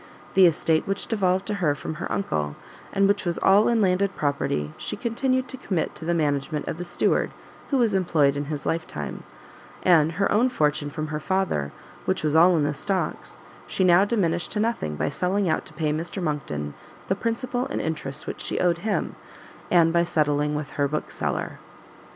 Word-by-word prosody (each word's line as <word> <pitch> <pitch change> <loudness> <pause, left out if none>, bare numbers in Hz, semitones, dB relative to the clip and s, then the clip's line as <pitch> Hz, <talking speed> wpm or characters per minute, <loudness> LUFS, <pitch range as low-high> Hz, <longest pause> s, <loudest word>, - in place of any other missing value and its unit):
The 190 -2 +7
estate 160 -1 +1
which 195 +1 -1
devolved 190 -4 +1
to 210 - -2
her 150 -4 +2
from 155 - -5
her - - -4
uncle, 75 - -1 0.4
and 195 0 +3
which 200 0 +1
was 175 -3 -1
all 200 +2 +5
in 235 -2 +3
landed 195 +1 +2
property, 75 - -1
she - - -3
continued 255 +2 0
to 260 - -6
commit 185 -9 -2
to 160 - -8
the 170 +1 +1
management 150 -1 -1
of - - -3
the 175 - -5
steward 175 - +1 0.4
who 275 - +2
was 230 -4 +3
employed 160 -7 +3
in 145 0 -2
his 145 -1 -5
life 165 0 -1
time; 75 -2 -6 0.6
and 165 -3 +5
her 200 +4 +1
own 235 +5 +4
fortune 150 -8 0
from 155 +1 -4
her 150 0 -2
father, 180 - -1 0.3
which - - 0
was 155 0 +1
all 170 +2 +6
in 150 - +2
the 145 0 0
stocks, 190 +6 -3 0.3
she 190 - 0
now 180 +1 +6
diminished 175 -6 0
to 210 - -1
nothing 215 - -1
by - - -1
selling 185 +6 0
out 155 - 0
to - - -13
pay 155 -2 -1
Mr 165 +5 -4
Monckton 110 - -3 0.3
the - - +2
principal 245 +4 -2
and 275 - -3
interest 150 -4 -3
which - - -5
she - - -2
owed 175 -1 +2
him, 210 +2 -1 0.5
and 165 -2 +4
by 170 0 +4
settling 150 -3 +1
with 150 -1 -4
her 145 -1 0
Bookseller. 150 +2 -3
170 Hz, 195 wpm, -25 LUFS, 150-195 Hz, 0.6 s, The